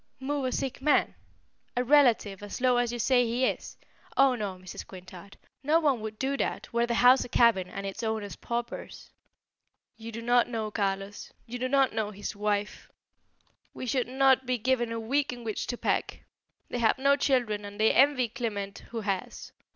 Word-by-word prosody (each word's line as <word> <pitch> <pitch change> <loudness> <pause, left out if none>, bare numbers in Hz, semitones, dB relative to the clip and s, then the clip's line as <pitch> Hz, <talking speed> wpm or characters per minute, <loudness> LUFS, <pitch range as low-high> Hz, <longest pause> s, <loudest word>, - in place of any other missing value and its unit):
"Move 280 +1 -2
a 255 - -1
sick 265 0 -3
man? 300 +2 +3 0.6
a 245 - +2
relative 240 -8 +3
as 205 +3 -6
low 250 -1 +3
as 245 -1 +1
you 240 - -4
say 245 +2 +3
he 240 +2 0
is? - - -3 0.4
Oh 270 -1 +5
no, 205 -5 -3
Mrs. 185 0 -9
Quintard; 185 +1 -12 0.3
no 305 +4 +4
one 280 -8 +1
would 215 0 -6
do 270 +3 -1
that, - - -3
were 235 0 +2
the 235 - 0
house 250 +2 +6
a - - -9
cabin 225 -6 +3
and 195 - -6
its 195 +3 -5
owners 220 -3 -3
paupers." 235 0 -6 0.9
"You 225 0 -8
do 230 +1 -7
not 245 +1 +3
know 220 -3 -3
Carlos; 195 -1 -3
you 245 +1 -6
do 255 - -1
not 270 -1 +3
know 220 -2 -1
his 205 +1 -6
wife. 205 0 -2 0.9
We - - -5
should 250 0 0
not 265 0 +3
be 255 0 +1
given 240 0 0
a 230 - -3
week 275 +6 0
in 245 -1 -8
which 220 -2 -3
to 245 - -3
pack. - - -1 0.5
They 245 - -4
have 225 +1 +3
no 275 +1 +4
children 245 -7 0
and 205 0 -9
they 220 - +4
envy 265 -2 +4
Clement 210 -5 -4
who 230 -1 -4
has. 195 -3 -4
235 Hz, 190 wpm, -28 LUFS, 210-260 Hz, 0.9 s, house